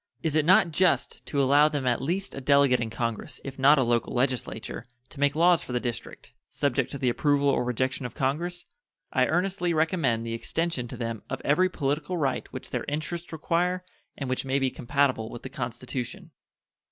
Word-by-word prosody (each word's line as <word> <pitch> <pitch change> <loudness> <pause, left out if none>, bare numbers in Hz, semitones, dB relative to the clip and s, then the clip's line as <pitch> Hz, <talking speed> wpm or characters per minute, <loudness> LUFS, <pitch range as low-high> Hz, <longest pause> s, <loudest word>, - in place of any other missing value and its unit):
Is 160 -3 0
it 155 -1 +3
not 185 0 +5
just 180 +3 +1
to 140 - -1
allow 140 +2 +5
them 145 -3 -2
at 120 -1 +1
least 180 +7 -1
a 135 - -6
Delegate 140 -2 +4
in 115 -1 -2
Congress, 115 +3 -4
if 135 -1 -7
not 140 +3 +6
a 130 - +4
local 120 0 0
legislature, 125 -3 -2 0.3
to 140 - -11
make 145 0 +2
laws 170 +1 +5
for 125 - -7
the 125 - +1
District, 120 -2 -6 0.2
subject 140 -3 0
to 140 - -5
the 130 - -1
approval 145 +3 +2
or 135 - +2
rejection 130 +2 -1
of - - -15
Congress? 170 +7 -2 0.5
I - - +3
earnestly 180 -1 0
recommend 155 -8 +1
the 115 - -3
extension 150 +2 -2
to 125 - -8
them 115 -2 -4
of - - -3
every 185 +6 +3
political 150 +2 -2
right 140 -5 -1
which - - -7
their - - -2
interests 165 +4 -4
require 175 +3 0 0.3
and 135 - -4
which 130 0 -1
may 135 0 0
be 135 -2 +1
compatible 130 -3 0
with 120 - -9
the 130 - -6
Constitution. 125 - -5
140 Hz, 195 wpm, -27 LUFS, 125-165 Hz, 0.5 s, not